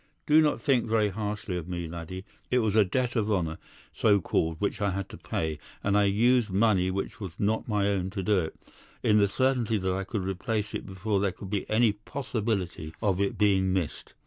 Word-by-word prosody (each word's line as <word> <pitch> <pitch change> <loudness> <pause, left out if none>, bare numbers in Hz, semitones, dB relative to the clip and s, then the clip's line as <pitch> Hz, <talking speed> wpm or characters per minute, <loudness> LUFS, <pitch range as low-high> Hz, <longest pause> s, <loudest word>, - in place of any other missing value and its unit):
Do 155 +1 +6
not 150 -1 +2
think 125 -4 +2
very 110 -2 +2
harshly 105 -1 -3
of 85 -1 -6
me, 85 -2 -4
laddie. 85 +3 -7 0.2
It 125 - +2
was 110 -4 +1
a 110 - +7
debt 125 +6 -1
of 110 -2 +1
honour, 85 -5 -1 0.3
so 105 -2 +4
called, 80 -2 0
which 105 +2 -1
I 100 - +2
had 95 0 -3
to - - -9
pay, 80 -1 -3 0.2
and 100 0 +1
I 105 0 +5
used 115 +3 +3
money 95 -2 +3
which 95 +4 -3
was 95 -6 -6
not 110 +2 0
my 105 -3 +1
own 95 -2 0
to 95 - -1
do 100 +1 +3
it, 80 -3 -3 0.5
in 105 0 +4
the 100 - +4
certainty 125 0 +1
that 95 -1 -1
I 95 +1 -2
could 100 0 -3
replace 105 +3 -2
it - - -4
before 95 +2 -1
there 100 -1 +1
could 95 +1 -10
be 100 -2 -2
any 110 0 +4
possibility 105 - -3
of 100 -3 +1
its 100 - 0
being 95 -3 +3
missed. 90 -5 -3
100 Hz, 215 wpm, -28 LUFS, 95-110 Hz, 0.5 s, a